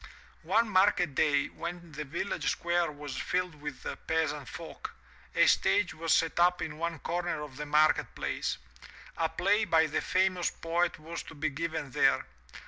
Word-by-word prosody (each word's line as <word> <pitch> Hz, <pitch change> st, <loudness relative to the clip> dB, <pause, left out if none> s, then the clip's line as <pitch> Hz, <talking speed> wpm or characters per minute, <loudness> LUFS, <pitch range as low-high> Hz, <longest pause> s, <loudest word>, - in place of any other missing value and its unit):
One 230 Hz, +1 st, +3 dB
market 185 Hz, -5 st, +3 dB
day, 145 Hz, 0 st, +3 dB
when 170 Hz, 0 st, -7 dB
the 150 Hz, +1 st, -5 dB
village 145 Hz, +8 st, -2 dB
square 170 Hz, -1 st, 0 dB
was 145 Hz, -2 st, -7 dB
filled 180 Hz, -1 st, -1 dB
with 150 Hz, -2 st, -7 dB, 0.2 s
peasant 160 Hz, -4 st, 0 dB
folk, -, -, -8 dB, 0.4 s
a -, -, +6 dB
stage 205 Hz, -4 st, +3 dB
was 165 Hz, 0 st, -2 dB
set 165 Hz, +1 st, +3 dB
up 180 Hz, +1 st, +4 dB
in 155 Hz, 0 st, -5 dB
one 170 Hz, 0 st, -2 dB
comer 175 Hz, +3 st, -2 dB
of 140 Hz, -3 st, -10 dB
the 150 Hz, 0 st, -5 dB
market 150 Hz, +1 st, +3 dB
place. -, -, -2 dB, 0.6 s
A 165 Hz, -1 st, +1 dB
play 200 Hz, +6 st, +2 dB
by 165 Hz, -5 st, +4 dB
the 155 Hz, 0 st, -1 dB
famous 185 Hz, -1 st, +1 dB
poet 170 Hz, +1 st, -1 dB
was 165 Hz, +2 st, -6 dB
to -, -, -11 dB
be 155 Hz, +1 st, -1 dB
given 160 Hz, -1 st, -3 dB
there. -, -, +3 dB
165 Hz, 165 wpm, -30 LUFS, 150-175 Hz, 0.6 s, a